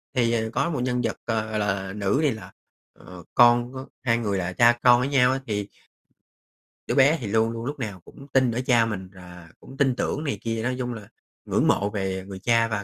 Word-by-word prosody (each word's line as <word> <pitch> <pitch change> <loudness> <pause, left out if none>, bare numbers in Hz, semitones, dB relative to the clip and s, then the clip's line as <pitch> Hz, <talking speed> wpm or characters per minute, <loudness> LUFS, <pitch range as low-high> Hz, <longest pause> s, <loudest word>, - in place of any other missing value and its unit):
Thì, 120 -2 +2
ờ, 110 -1 0
có 140 +6 0
một 150 - -2
nhân 125 0 0
vật, - - -2
ờ, 110 -2 -1
gọi 110 0 -2
là, 95 -2 -2
nữ, 105 +5 0
thì 150 -3 +2
là, 110 -2 -8 0.5
ờ, 90 -1 -12
con 120 +1 +5
của 130 0 -7 0.2
hai 115 -2 +2
người 105 -4 -1
là 90 0 -3
cha 120 +3 +4
con 120 -1 +6
với 130 +2 -1
nhau 130 -3 +4
á, 135 - -2
thì 105 -2 -2 1.2
đứa - - -1
bé 140 +4 +5
thì 115 - -4
luôn 110 +2 +1
luôn 115 0 -6
lúc 145 +2 -5
nào 100 -7 -5
cũng 140 - -14
tin 130 -3 +3
ở 120 - -2
cha 120 -3 +4
mình 95 -5 -5
và 90 -2 -13
cũng 135 - -14
tin 135 -3 +2
tưởng 145 +4 -2
này 145 - -2
kia, 115 -1 -3
nói 125 +2 -1
chung 125 -1 -3
là 105 -3 -9 0.4
ngưỡng - - +1
mộ 100 - +2
về 95 -2 -3
người 95 -1 -8
cha, 115 +3 +2
và 105 -2 -3
115 Hz, 240 wpm, -24 LUFS, 100-125 Hz, 1.2 s, con